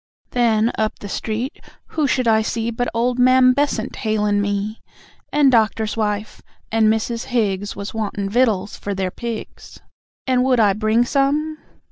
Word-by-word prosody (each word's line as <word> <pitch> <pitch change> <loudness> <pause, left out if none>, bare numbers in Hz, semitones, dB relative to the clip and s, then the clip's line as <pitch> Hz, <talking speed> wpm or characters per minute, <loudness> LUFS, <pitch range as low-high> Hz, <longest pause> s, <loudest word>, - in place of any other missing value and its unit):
Then, 230 -2 +2
up 215 0 0
the 205 - -8
street, 225 +6 -4 0.3
who 305 -3 0
should 255 -2 0
I 220 -1 +4
see, 230 +1 -2
But 245 +2 -2
old 245 +2 0
Mam 255 0 +6
Bessant 280 -5 -1
hail'n' 210 -2 +1
me. 205 +2 -2 0.5
And 290 -2 +4
Doctor's 220 -2 +1
wife, 210 -1 -2 0.3
and 220 0 +3
Mrs. 225 +2 0
Higgs 205 -5 -1
Was 200 - -6
wantin' 205 -2 -3
vittles 210 -3 +1
for 200 -1 -4
their 190 -1 -2
pigs, 235 0 -7 0.5
And 255 -1 +2
would 255 -2 +2
I 205 -3 +4
bring 215 +3 +2
some? 295 +4 0
225 Hz, 155 wpm, -20 LUFS, 210-250 Hz, 0.5 s, Mam